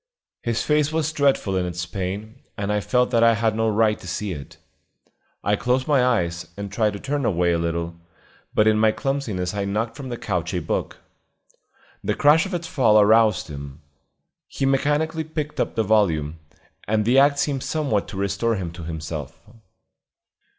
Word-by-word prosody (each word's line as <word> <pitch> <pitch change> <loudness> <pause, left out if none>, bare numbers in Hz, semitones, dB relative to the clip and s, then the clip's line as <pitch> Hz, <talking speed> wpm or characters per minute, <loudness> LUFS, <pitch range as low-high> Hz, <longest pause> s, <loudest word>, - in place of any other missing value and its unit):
His 115 -1 -1
face 150 0 +2
was 160 -1 -1
dreadful 140 -10 +1
in 90 - +1
its 85 0 -4
pain, 100 +6 -5 0.2
and 100 +1 -1
I 105 - +1
felt 125 +4 +1
that 115 -2 +3
I 115 -1 +6
had 110 -1 +1
no 115 0 +1
right 110 0 +2
to - - -11
see 100 +4 -3
it. 70 -5 -8 0.9
I 105 - +2
closed 125 +4 0
my 140 -4 +4
eyes, 85 -9 0
and 100 -1 -5
tried 105 0 +1
to 100 - -6
turn 145 +3 -2
away 90 -5 +2
a 85 - +1
little, 85 0 -2 0.6
but 105 - +4
in 110 0 +4
my 110 0 +4
clumsiness 110 -11 -2
I 100 -1 -2
knocked 110 +3 -2
from 135 -3 -7
the 120 - -4
couch 90 -4 -2
a - - +1
book. 75 - -3 1.1
The - - 0
crash 160 +6 +4
of 190 - -4
its 170 -1 -4
fall 130 -11 +4
aroused 110 -1 +4
him. 70 0 -9 0.6
He 135 - -3
mechanically 150 +4 +1
picked 155 -1 -5
up - - -1
the 110 - +2
volume, 85 -8 +1 0.5
and 105 0 +1
the 125 +4 +5
act 140 +1 +4
seemed 140 -1 0
somewhat 140 -11 -1
to 100 - -8
restore 100 +4 0
him 90 -4 -4
to 85 +1 -10
himself. 80 -1 -6
110 Hz, 185 wpm, -23 LUFS, 90-135 Hz, 1.1 s, I